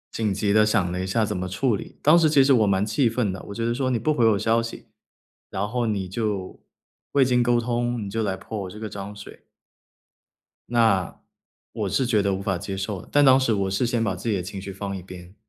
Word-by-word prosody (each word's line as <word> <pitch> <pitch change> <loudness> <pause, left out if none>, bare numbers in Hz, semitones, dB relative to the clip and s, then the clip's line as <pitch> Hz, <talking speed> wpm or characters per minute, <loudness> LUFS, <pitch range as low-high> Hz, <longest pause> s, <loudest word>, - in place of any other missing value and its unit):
紧 110 -3 0
急 100 +1 0
地 110 0 +5
想 105 -5 +1
了 90 +1 -3
一 95 - -3
下 110 +3 +1
怎 105 - -3
么 90 0 -3
处 110 +6 0
理。 - - -9
当 155 +4 +6
时 160 -2 +4
其 140 -3 +5
实 135 0 +4
我 110 -4 +4
蛮 95 +1 +2
气 115 +3 +2
愤 115 -4 -1
的， 95 - -7
我 - - -5
觉 115 0 -2
得 120 - +1
说 130 +1 -1
你 120 -3 0
不 155 +7 +1
回 120 -5 +2
我 105 -2 +2
消 115 +1 +2
息， 115 0 -8 0.6
然 100 +2 -2
后 120 +1 -1
你 100 -3 -2
就 100 -1 -3 0.5
未 140 -2 +5
经 125 -1 +2
沟 120 0 +3
通， 120 -1 -1
你 100 - -5
就 110 +2 -2
来 95 -3 -1
泼 105 +1 -6
我 95 - -6
这 105 - -10
个 110 -1 -5
脏 100 +1 -7
水 100 - -12 1.2
那， 110 -6 +1 0.5
我 - - -2
是 130 - +1
觉 110 -4 +3
得 100 -1 +1
无 95 - -3
法 95 -2 -1
接 95 +3 -5
受 95 -1 -4
的。 - - -17
但 145 - +4
当 130 -1 +7
时 125 -4 +1
我 100 -2 0
是 100 +6 +1
先 120 -1 0
把 95 -4 -1
自 95 +6 -4
己 105 - +1
的 95 - -1
情 95 +1 -7
绪 100 0 -7
放 100 0 -5
一 - - -8
边， 90 0 -12
105 Hz, 280 characters per minute, -24 LUFS, 95-120 Hz, 1.2 s, 当